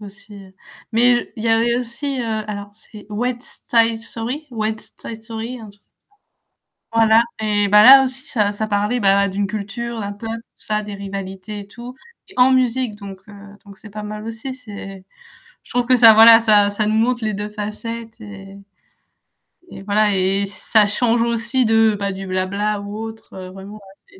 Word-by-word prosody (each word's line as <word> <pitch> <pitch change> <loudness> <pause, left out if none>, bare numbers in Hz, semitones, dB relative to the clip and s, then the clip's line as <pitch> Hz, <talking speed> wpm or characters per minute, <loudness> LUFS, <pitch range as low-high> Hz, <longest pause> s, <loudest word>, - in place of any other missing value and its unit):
aussi, 210 +1 -13
heu, 195 -1 -13 0.4
mais 240 +1 +2
il 225 - -6
y - - +1
avait 230 +1 +2
aussi, 250 +3 -4
alors 210 -3 -4
c'est 210 -1 -14
West 240 +3 -5
side 230 -1 +3
story? 250 +7 -6
West 220 -2 -5
side 225 -1 -8
story, 230 +2 -7
un 215 -2 -11
truc 200 0 -23 1.1
Voilà 225 0 +5 0.2
et 205 -2 0
bah 210 +1 +6
là 270 +1 +10
aussi 260 0 -4
ça 210 -4 +1
ça 210 +1 -4
parlait 210 +4 0
bah 200 -1 +3
d'une 200 +1 -2
culture, 220 +3 -5
d'un 205 -1 -4
peuple, 225 +2 -6
tout - - -22
ça, 215 0 -1
des 205 -1 -7
rivalités 195 +1 -7
et 200 - -12
tout 245 +3 -10 0.4
en 250 +1 +5
musique 255 -3 0
donc, 195 -2 -10
heu, 205 - -12 0.3
donc 200 -2 -15
c'est 210 - -13
pas 210 +1 -7
mal 210 +1 -7
aussi, 230 +4 -6
c'est 200 -5 -10 0.6
je - - -22
trouve 245 -1 0
que 255 +1 +4
ça 225 -2 +8
voilà 225 +1 +8
ça 210 -2 +4
ça 210 +1 -2
nous 215 +1 0
montre 240 +1 +1
les 215 -1 -1
2 205 +1 -4
facettes 220 +2 -7
et 200 -2 -11 1.3
voilà 210 0 +2
et 190 +2 +1
et 200 - -1
ça 210 +1 +2
change 235 +2 +1
aussi 235 +2 0
de, 225 -1 +3
enfin 200 0 -3
du 190 0 -7
blabla 200 +3 -2
ou 205 +1 -7
autre, 225 -2 -9
heu, 185 -1 -8
vraiment 195 +2 -11
ouais 210 - -18
215 Hz, 185 wpm, -19 LUFS, 205-230 Hz, 1.3 s, là